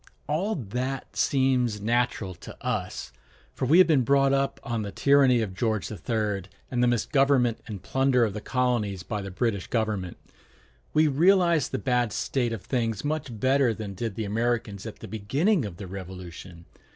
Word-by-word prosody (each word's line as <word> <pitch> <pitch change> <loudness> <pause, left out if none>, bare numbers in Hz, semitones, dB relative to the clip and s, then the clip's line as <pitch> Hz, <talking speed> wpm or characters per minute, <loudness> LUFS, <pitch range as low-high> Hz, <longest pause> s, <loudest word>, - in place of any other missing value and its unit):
] - - -37
All 185 +9 0
that 130 - -4
seems 130 -5 +2
natural 115 -3 0
to - - -11
us; - - -3 0.4
for 130 - -2
we 155 +6 +6
have 185 - +8
been 155 -5 +3
brought 135 +2 +3
up 140 0 0
on 120 -4 -2
the 100 -1 -4
tyranny 135 -2 +4
of 100 -4 -3
George 110 0 -1
III, 105 -1 -2 0.3
and 125 -1 0
the 125 - +4
misgovernment 125 0 +2
and 100 -4 -7
plunder 130 -2 +2
of 105 - -3
the 105 - -5
colonies 120 -8 0
by 105 0 -3
the 100 - -6
British 100 0 -1
government. 105 -6 -2 0.7
We 155 0 +4
realize 170 +2 +4
the - - -2
bad 125 -4 0
state 120 +1 -1
of 115 -4 -5
things 115 -2 -1
much 145 -7 -3
better 130 -2 +3
than 105 -2 -6
did 110 +1 -4
the 110 - -3
Americans 110 -1 -1
at 110 - -7
the - - -7
beginning 140 - +1
of 95 -5 -7
the 100 - -7
Revolution. 90 -2 -9
120 Hz, 175 wpm, -26 LUFS, 105-135 Hz, 0.7 s, have